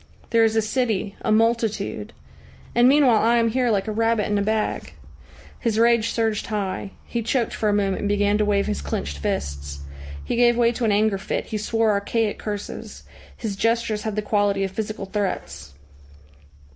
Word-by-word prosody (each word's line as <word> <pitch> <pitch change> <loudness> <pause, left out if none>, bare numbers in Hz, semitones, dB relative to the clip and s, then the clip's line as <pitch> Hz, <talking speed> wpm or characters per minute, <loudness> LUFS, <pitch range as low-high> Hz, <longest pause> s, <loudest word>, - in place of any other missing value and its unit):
There 230 -1 +5
is 225 0 +2
a 220 - +3
city, 215 -3 -1
a - - 0
multitude. 225 0 +1 0.6
And 240 +1 +5
meanwhile 265 -6 +5
I 235 +2 +3
am 230 -1 +3
here 250 +1 +1
like 205 -1 +1
a - - -1
rabbit 225 0 +1
in 210 - -1
a - - +1
bag." 215 +1 -1 0.7
His 225 -3 0
rage 230 -1 +4
surged 225 -2 -1
high. 200 -2 -3
He 235 - -3
choked 235 +1 0
for 215 - 0
a - - +3
moment 200 -2 +1
and 205 - -1
began 205 0 +2
to 210 - +3
wave 200 -1 +2
his - - -2
clenched 70 0 -4
fists. 70 0 -3 0.4
He - - -1
gave 240 0 +4
way 235 -1 +4
to 240 0 -2
an 215 - +3
anger 205 -1 +2
fit, - - -3
he 215 - -4
swore 225 +1 +1
archaic 210 +2 0
curses. 205 -1 -6 0.3
His 215 -4 -4
gestures 230 0 0
had 220 -2 -3
the 215 - -1
quality 205 -2 +1
of 195 - -2
physical 215 0 -4
threats. 75 - -4
215 Hz, 185 wpm, -23 LUFS, 200-230 Hz, 0.7 s, There